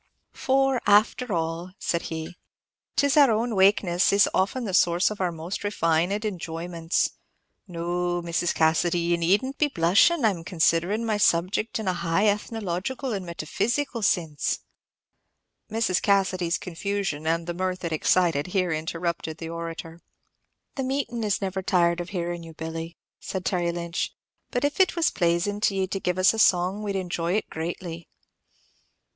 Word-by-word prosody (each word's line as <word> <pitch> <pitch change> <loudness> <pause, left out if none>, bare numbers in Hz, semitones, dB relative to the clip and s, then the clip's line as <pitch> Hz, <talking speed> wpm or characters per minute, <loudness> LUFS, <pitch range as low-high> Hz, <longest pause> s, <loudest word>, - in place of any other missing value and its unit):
"For, 270 -1 +1
after 215 +4 +3
all," 165 +1 -2
said 170 - -1
he, 160 +1 -5 0.6
"'tis 285 -1 +3
our 285 -3 +7
own 225 +2 0
wakenesses 190 -2 +3
is 200 0 +4
often 230 +6 0
the 195 - -4
source 175 +2 +3
of 210 - -6
our 180 -2 +1
most 165 +3 -5
refined 190 +1 0
enjoyments. 170 -3 -2 0.6
No, 175 0 -2
Mrs. 170 0 -1
Cassidy, 165 +2 +2
ye 170 0 +1
need 180 +7 +2
n't 270 +1 -7
be 300 - +4
blushin'. 225 - +3
I 220 - +5
'm 170 -4 -7
considerin' 175 +5 +1
my 215 -2 0
subject 190 +3 +1
in 220 -3 -4
a 185 - +2
high 175 +3 0
ethnological 210 +4 -2
and 190 -3 -4
metaphysical 235 - -2
sinse." 165 -7 0 1.1
Mrs. 220 -4 +1
Cassidy's 185 -4 +1
confusion, 185 -3 -3
and 165 +1 +1
the 175 - -3
mirth 185 +1 -3
it 170 - -2
excited, 160 -1 +2
here 180 -2 0
interrupted 165 0 -3
the 165 0 -6
orator. 165 0 -6 0.8
"The 270 - -1
meeting 255 -3 -2
is 205 -1 0
never 190 0 -2
tired 175 -2 +2
of 175 0 -5
hearin' 175 -2 -3
you, 165 -1 -10
Billy," 165 +1 -6 0.2
said 190 -1 -5
Terry 175 -3 0
Lynch; 170 0 -3 0.3
"but 245 - -2
if 290 +4 -2
it 375 -2 +4
was 335 -2 +2
plazin' 175 +4 0
to 205 -2 +2
ye 190 -1 +1
to 195 +1 -4
give 180 -1 -1
us 185 +3 +5
a 225 - -3
song, 185 0 +3
we'd 205 -2 -3
enjoy 175 -2 -2
it 215 - -1
greatly." 165 +1 -5
180 Hz, 160 wpm, -25 LUFS, 170-205 Hz, 1.1 s, our